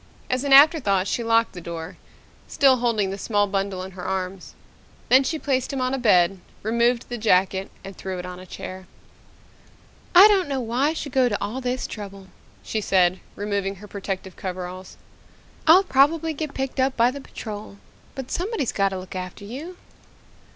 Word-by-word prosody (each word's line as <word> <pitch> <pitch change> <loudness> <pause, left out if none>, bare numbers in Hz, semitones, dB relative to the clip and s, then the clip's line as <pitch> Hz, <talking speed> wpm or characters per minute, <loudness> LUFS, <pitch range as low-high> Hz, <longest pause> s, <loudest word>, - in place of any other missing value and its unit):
As 255 +1 0
an 280 - -2
afterthought 270 - +6
she 235 - -1
locked 230 0 +2
the 180 - -8
door, 170 +1 -7 0.5
still 270 -3 +4
holding 225 -5 0
the 195 - -6
small 205 0 +1
bundle 195 -2 -2
in 190 - -8
her 180 -1 -9
arms. 185 0 -4 0.5
Then 260 +2 +6
she 315 +4 -2
placed 265 -4 -1
him 275 - -3
on 255 +1 0
a 270 - -1
bed, 190 -5 +3 0.2
removed 235 +2 +1
the 240 -1 -5
jacket 190 -2 +2
and 195 0 -9
threw 190 -1 -5
it 180 - -6
on 180 0 -8
a 185 - -12
chair. 185 +1 -8 1.3
"I 380 +4 +11
don't 390 -7 +2
know 275 -1 -1
why 245 +4 0
I 310 - 0
should 300 -3 -5
go 255 -1 +3
to 205 - -1
all 210 +6 -4
this 250 0 -2
trouble," 195 -2 -8 0.3
she 220 - -2
said, 185 -2 +2 0.2
removing 200 -1 -2
her 205 +2 -12
protective 195 -2 -5
coveralls. 185 0 -7 0.7
"I'll 355 +5 +8
probably 320 +1 +2
get 305 -1 -5
picked 270 0 -3
up 260 +1 +1
by 240 +1 +4
the 280 +1 -8
Patrol. 210 -5 -8 0.4
But 265 -2 -7
somebody's 370 - -1
got 195 -1 +1
to 190 - -5
look 185 0 -9
after 185 +2 -6
you." 300 - -8
215 Hz, 185 wpm, -23 LUFS, 190-265 Hz, 1.3 s, I